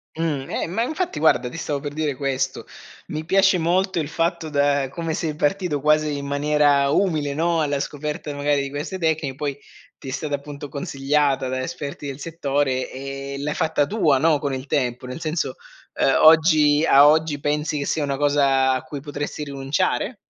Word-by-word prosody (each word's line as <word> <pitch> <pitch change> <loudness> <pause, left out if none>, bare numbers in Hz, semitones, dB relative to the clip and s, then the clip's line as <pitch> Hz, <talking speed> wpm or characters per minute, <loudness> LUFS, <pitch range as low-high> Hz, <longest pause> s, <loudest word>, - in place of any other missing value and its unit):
Mh. 160 - -4 0.3
Eh, - - -2
ma 185 +7 -2
infatti 315 - -3
guarda, 130 -5 +3
ti 145 - -9
stavo 150 -3 -2
per 145 0 -6
dire 150 -2 -1
questo: 135 -1 -2 0.4
mi 155 0 -4
piace 195 +2 +4
molto 180 +2 +1
il 155 - -2
fatto 165 0 -1
da 140 -2 +1
come 165 +3 -4
sei 155 -1 -2
partito 155 0 0
quasi 150 0 +2
in 140 - -5
maniera 145 0 +2
umile, 155 -4 +1
no, 165 +2 +1
alla 145 -2 0
scoperta 150 +1 -4
magari 145 0 +1
di 140 - -4
queste 145 +7 -5
tecni 160 -5 -1
poi, 140 -1 -3 0.4
ti 135 - -8
è - - -4
stata, 145 +2 -2
appunto, 145 0 -8
consigliata 140 -1 0
da 130 0 -2
esperti 140 +2 -6
del 135 0 -6
settore, 140 -5 -1
e 135 +1 -6
l'hai 150 +1 -2
fatta 160 -3 +1
tua, 160 -7 +2
no, 155 +2 +3
con 140 -1 -2
il 130 0 -5
tempo, 125 -4 -1
nel 125 +3 -6
senso, 155 -4 -2 0.4
uhm, 135 - +4
oggi 155 -1 +6
a 140 -1 +7
oggi 155 -1 +2
pensi 150 +1 -1
che 140 - -2
sia 155 - -1
una 140 -1 -2
cosa 140 -2 +3
a 130 - -1
cui 145 - -7
potresti 145 +1 -5
rinunciare? 145 - -1
145 Hz, 185 wpm, -22 LUFS, 140-160 Hz, 0.4 s, a